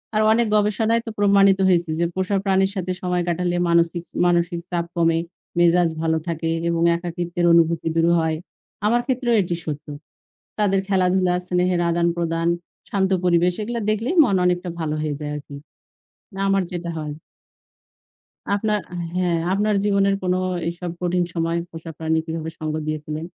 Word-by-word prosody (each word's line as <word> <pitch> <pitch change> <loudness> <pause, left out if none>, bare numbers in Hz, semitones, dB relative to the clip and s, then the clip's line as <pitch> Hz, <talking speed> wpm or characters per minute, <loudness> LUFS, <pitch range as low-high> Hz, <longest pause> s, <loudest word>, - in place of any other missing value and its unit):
আর 215 - +3
অনেক 230 +1 +3
গবেষণায় 220 +2 +2
তো - - -5
প্রমাণিত 200 -1 +5
হয়েছে 175 -2 +2
যে, 170 - +2
পোষা 190 +1 0
প্রাণীর 195 0 +2
সাথে 185 -1 -2
সময় 180 -1 0
কাটালে 175 +1 0
মানচিক 170 0 +2 0.2
মানসিক 175 -1 +1
চাপ 170 -1 -1
কমে, 165 -1 +2 0.4
মেজাজ 175 0 +4
ভালো 160 0 +1
থাকে 165 -1 -2 0.2
এবং 170 0 0
একাকীত্বের 175 0 -3
অনুভূতি 165 -1 +3
দূর 165 0 +3
হয়। 160 -1 0 0.5
আমার 240 +3 +3
ক্ষেত্রেও 245 -2 +1
এটি 175 -1 -2
সত্য। 150 -1 -5 0.7
তাদের 195 -2 +2
খেলাধুলা, 185 -1 +2
স্নেহের 180 0 +1
আদান-প্রদান, 170 -1 0 0.4
শান্ত 195 -1 0
পরিবেশ 175 0 +3
এগুলা 235 +2 -3
দেখলেই 225 - 0
মন 200 -7 +1
অনেকটা 180 0 0
ভালো 155 -1 -2
হয়ে 150 -2 -2
যায় 150 0 -4
আরকি। 145 -1 -8 0.8
না, 195 - -7
আমার 195 -1 +2
যেটা 175 -1 -4
হয় 150 -1 -4 1.4
আপনার, 210 0 0 0.4
হ্যাঁ, 175 -2 +1
আপনার 210 +2 +1
জীবনের 200 -1 +3
কোন 180 0 +1 0.3
এইসব 175 +1 -4
কঠিন 180 0 +1
সময়ে 165 0 0
পোষা 165 0 -8
প্রাণী 160 0 0
কিভাবে 160 0 -4
সঙ্গ 155 0 -2
দিয়েছিলেন? 155 +1 -4
175 Hz, 150 wpm, -22 LUFS, 165-195 Hz, 1.4 s, প্রমাণিত